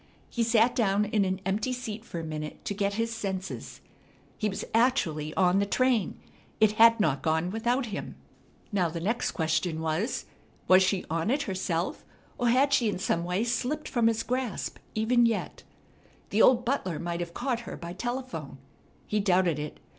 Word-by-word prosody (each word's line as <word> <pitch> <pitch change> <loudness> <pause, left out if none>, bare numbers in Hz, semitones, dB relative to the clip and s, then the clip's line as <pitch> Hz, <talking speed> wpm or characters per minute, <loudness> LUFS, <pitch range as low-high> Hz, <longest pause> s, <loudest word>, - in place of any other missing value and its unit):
He 235 - -2
sat 230 +1 +3
down 205 -3 +2
in 210 -1 +1
an 190 0 -2
empty 210 +6 0
seat 230 -4 -5
for 175 -7 -6
a - - -5
minute 155 -1 -6
to - - -1
get 200 0 -1
his 230 +1 -1
senses. 190 -3 -5 0.5
He 210 - -1
was 195 - -4
actually 175 - +2
on 185 0 +3
the 200 - +2
train! 250 -3 +1 0.4
It 215 -1 +5
had 230 +1 +6
not 145 -8 +1
gone 160 +3 0
without 240 +4 0
him! 210 -3 -6 0.6
Now 185 -5 +1
the 165 +1 -5
next 220 +8 -1
question 160 0 0
was, 160 +9 -1 0.4
Was 185 +1 +7
she 185 0 +1
on 165 +5 -1
it 285 +3 +1
herself, 185 -5 -2 0.4
or 245 -1 +2
had 270 +4 +4
she 235 -5 +3
in 205 - -2
some 170 -2 0
way 180 +4 0
slipped 255 +5 -1
from 235 -2 +2
his 230 0 +1
grasp 250 -3 -3 0.2
even 235 +2 +4
yet? 225 -3 -3 0.7
The 215 - +3
old 245 -1 +5
butler 190 - -1
might 170 0 -3
have 170 -1 -5
caught 245 -2 -1
her - - -6
by 170 0 -7
telephone. 240 - -5 0.5
He 210 - 0
doubted 180 -5 +2
it. 150 0 -6
205 Hz, 180 wpm, -28 LUFS, 175-235 Hz, 0.7 s, Was